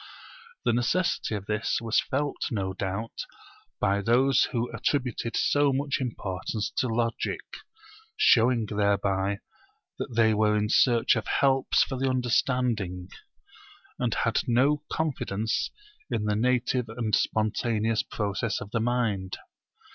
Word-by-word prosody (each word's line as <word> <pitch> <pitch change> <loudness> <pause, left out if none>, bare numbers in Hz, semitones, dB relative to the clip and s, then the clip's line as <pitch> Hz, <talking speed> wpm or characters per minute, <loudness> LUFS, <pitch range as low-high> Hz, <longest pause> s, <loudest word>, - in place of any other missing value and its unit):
The 120 - +3
necessity 120 +1 0
of 100 -2 -5
this 105 +1 -1
was 115 -1 +1
felt 145 +1 -2
no 95 -4 -2
doubt 100 +4 -4 0.5
by 100 +1 +1
those 125 +6 +4
who 120 0 -2
attributed 125 -4 -1
so 145 -1 +3
much 140 +1 -1
importance 105 -3 -3
to 130 - +2
Logic; 115 0 -1 0.8
showing 115 -1 +4
thereby 100 -1 0 0.6
that 120 - -5
they 110 -1 +4
were 105 0 +2
in 105 0 0
search 120 0 +4
of 110 - -3
helps 135 -1 +3
for 130 -2 -4
the 135 0 +1
understanding, 120 -7 0 0.9
and 120 -2 0
had 115 -1 +1
no 135 +5 +3
confidence 115 -9 -1 0.4
in 105 - -1
the 105 -1 +1
native 125 +1 +1
and 110 -1 -3
spontaneous 110 0 +1
process 105 -1 -2
of 105 - -9
the 115 - 0
mind. 110 -5 -1
115 Hz, 125 wpm, -27 LUFS, 105-125 Hz, 0.9 s, those